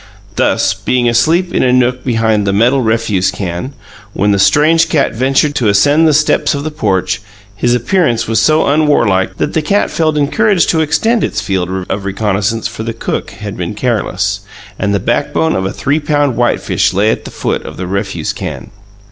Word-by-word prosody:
Thus, -, -, +1 dB
being 125 Hz, -1 st, 0 dB
asleep 160 Hz, +10 st, +2 dB
in -, -, +1 dB
a 125 Hz, -, +2 dB
nook 125 Hz, 0 st, +1 dB
behind 110 Hz, -4 st, 0 dB
the 100 Hz, -, +1 dB
metal 120 Hz, +6 st, +3 dB
refuse 110 Hz, -5 st, 0 dB
can, 95 Hz, +6 st, -5 dB, 0.4 s
when 105 Hz, +1 st, +1 dB
the 100 Hz, -, +1 dB
strange 160 Hz, +9 st, +3 dB
cat 150 Hz, -, +1 dB
ventured 135 Hz, +5 st, +1 dB
to 120 Hz, -6 st, 0 dB
ascend 145 Hz, +10 st, +4 dB
the 155 Hz, -, +3 dB
steps 150 Hz, 0 st, +2 dB
of 140 Hz, -, -4 dB
the 155 Hz, -, -4 dB
porch, 100 Hz, -11 st, -1 dB, 0.3 s
his 120 Hz, +3 st, +1 dB
appearance 120 Hz, -1 st, 0 dB
was 115 Hz, 0 st, +1 dB
so 155 Hz, 0 st, +3 dB
unwarlike 115 Hz, -11 st, +1 dB
that 150 Hz, -, -2 dB
the 160 Hz, -, +1 dB
cat 200 Hz, +7 st, 0 dB
felt 155 Hz, -2 st, 0 dB
encouraged 185 Hz, +5 st, +2 dB
to 160 Hz, -, +1 dB
extend 225 Hz, +9 st, +1 dB
its -, -, -1 dB
field 95 Hz, -1 st, -2 dB
of 100 Hz, +1 st, -3 dB
reconnaissance 105 Hz, +2 st, -1 dB
for -, -, -8 dB
the 115 Hz, +1 st, -4 dB
cook 115 Hz, -, -4 dB
had 105 Hz, -2 st, -8 dB
been 90 Hz, +3 st, -4 dB
careless, 105 Hz, -4 st, -1 dB, 0.4 s
and 100 Hz, -, 0 dB
the 100 Hz, -, +1 dB
backbone 80 Hz, -2 st, 0 dB
of 95 Hz, 0 st, -1 dB
a -, -, -4 dB
three 145 Hz, +3 st, -1 dB
pound 145 Hz, -3 st, 0 dB
whitefish 120 Hz, +1 st, 0 dB
lay 105 Hz, +3 st, +3 dB
at -, -, -3 dB
the -, -, -8 dB
foot -, -, -3 dB
of -, -, -9 dB
the 95 Hz, -, -4 dB
refuse 95 Hz, -3 st, -3 dB
can. -, -, -7 dB
115 Hz, 190 wpm, -13 LUFS, 100-150 Hz, 0.4 s, ascend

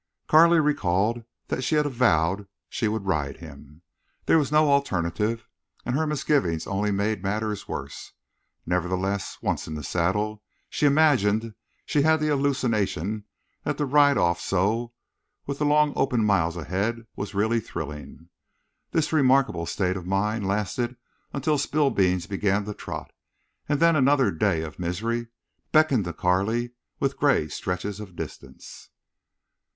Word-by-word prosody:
Carley 170 Hz, +2 st, +6 dB
recalled 115 Hz, -, +1 dB, 0.2 s
that -, -, -1 dB
she 130 Hz, +5 st, 0 dB
had 150 Hz, 0 st, +3 dB
avowed 100 Hz, -, +1 dB, 0.2 s
she 110 Hz, -, -2 dB
would 105 Hz, -1 st, -2 dB
ride 75 Hz, -7 st, -1 dB
him. 75 Hz, 0 st, -13 dB, 0.4 s
There 160 Hz, -, +5 dB
was 145 Hz, -2 st, -1 dB
no 150 Hz, -1 st, +4 dB
alternative, 105 Hz, -3 st, 0 dB, 0.4 s
and 120 Hz, -, -1 dB
her 155 Hz, +2 st, +1 dB
misgivings 135 Hz, -, 0 dB
only 100 Hz, +1 st, -1 dB
made 100 Hz, 0 st, 0 dB
matters 105 Hz, +1 st, -2 dB
worse. -, -, -7 dB, 0.5 s
Nevertheless, 95 Hz, +3 st, -1 dB
once -, -, -1 dB
in 80 Hz, -, -5 dB
the 75 Hz, -, -6 dB
saddle, 105 Hz, +8 st, -1 dB, 0.3 s
she 150 Hz, -, +2 dB
imagined 115 Hz, -8 st, +3 dB, 0.3 s
she 150 Hz, -, +1 dB
had 160 Hz, +2 st, +4 dB
the 155 Hz, 0 st, 0 dB
hallucination 115 Hz, -, 0 dB, 0.4 s
that -, -, -2 dB
to 145 Hz, -, 0 dB
ride 145 Hz, 0 st, +4 dB
off 85 Hz, 0 st, +1 dB
so, 110 Hz, +6 st, 0 dB, 0.5 s
with 140 Hz, 0 st, -4 dB
the 150 Hz, -, +1 dB
long 150 Hz, 0 st, +3 dB
open 125 Hz, -5 st, +1 dB
miles 90 Hz, -5 st, +1 dB
ahead, 100 Hz, +8 st, -2 dB
was 100 Hz, 0 st, -6 dB
really 110 Hz, +3 st, +2 dB
thrilling. 75 Hz, -3 st, -8 dB, 0.6 s
This 160 Hz, -1 st, 0 dB
remarkable 130 Hz, -, +3 dB
state 95 Hz, -2 st, -1 dB
of 90 Hz, -1 st, -8 dB
mind 100 Hz, +2 st, 0 dB
lasted 105 Hz, +5 st, -1 dB, 0.4 s
until 145 Hz, +2 st, 0 dB
Spillbeans 100 Hz, -, +1 dB
began 100 Hz, +2 st, 0 dB
to 105 Hz, -, -4 dB
trot, -, -, -7 dB, 0.6 s
and 145 Hz, -1 st, +1 dB
then 165 Hz, 0 st, +5 dB
another 135 Hz, -5 st, +3 dB
day 85 Hz, -1 st, 0 dB
of 80 Hz, +2 st, -8 dB
misery 115 Hz, +7 st, -2 dB, 0.4 s
beckoned 155 Hz, -, +4 dB
to 85 Hz, -, -4 dB
Carley 100 Hz, +8 st, 0 dB, 0.3 s
with 135 Hz, 0 st, -1 dB
gray 140 Hz, -, +2 dB
stretches 90 Hz, +6 st, -4 dB
of 95 Hz, -4 st, -9 dB
distance. -, -, -9 dB
105 Hz, 145 wpm, -25 LUFS, 95-140 Hz, 0.6 s, Carley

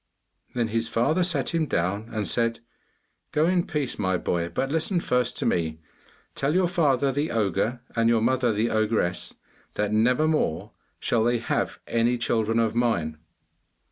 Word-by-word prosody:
Then 120 Hz, -2 st, 0 dB
his 115 Hz, +1 st, -1 dB
father 155 Hz, +10 st, +1 dB
sat 155 Hz, -7 st, 0 dB
him 165 Hz, -2 st, 0 dB
down 100 Hz, +3 st, -1 dB
and 105 Hz, -3 st, -2 dB
said, 115 Hz, +5 st, 0 dB, 0.7 s
'Go 150 Hz, +1 st, +2 dB
in 180 Hz, 0 st, +1 dB
peace, 145 Hz, -5 st, -3 dB
my 95 Hz, -2 st, +1 dB
boy, 85 Hz, -1 st, -1 dB
but 135 Hz, +8 st, -2 dB
listen 165 Hz, +4 st, +1 dB
first 125 Hz, -5 st, 0 dB
to -, -, -2 dB
me. 80 Hz, -2 st, 0 dB, 0.5 s
Tell 140 Hz, +4 st, -1 dB
your 185 Hz, -1 st, +3 dB
father 145 Hz, -6 st, +2 dB
the 145 Hz, +4 st, -1 dB
ogre 110 Hz, +3 st, 0 dB
and 115 Hz, 0 st, +3 dB
your 115 Hz, -1 st, +3 dB
mother 125 Hz, 0 st, +2 dB
the 110 Hz, +2 st, 0 dB
ogress, 110 Hz, -5 st, 0 dB, 0.4 s
that 105 Hz, 0 st, 0 dB
never 125 Hz, +8 st, +3 dB
more 100 Hz, -, 0 dB, 0.3 s
shall 115 Hz, -2 st, +1 dB
they 120 Hz, +1 st, +2 dB
have 115 Hz, -, -2 dB
any 115 Hz, +1 st, +1 dB
children 115 Hz, -1 st, 0 dB
of 115 Hz, -1 st, +2 dB
mine. 85 Hz, -11 st, 0 dB
115 Hz, 165 wpm, -25 LUFS, 110-135 Hz, 0.7 s, your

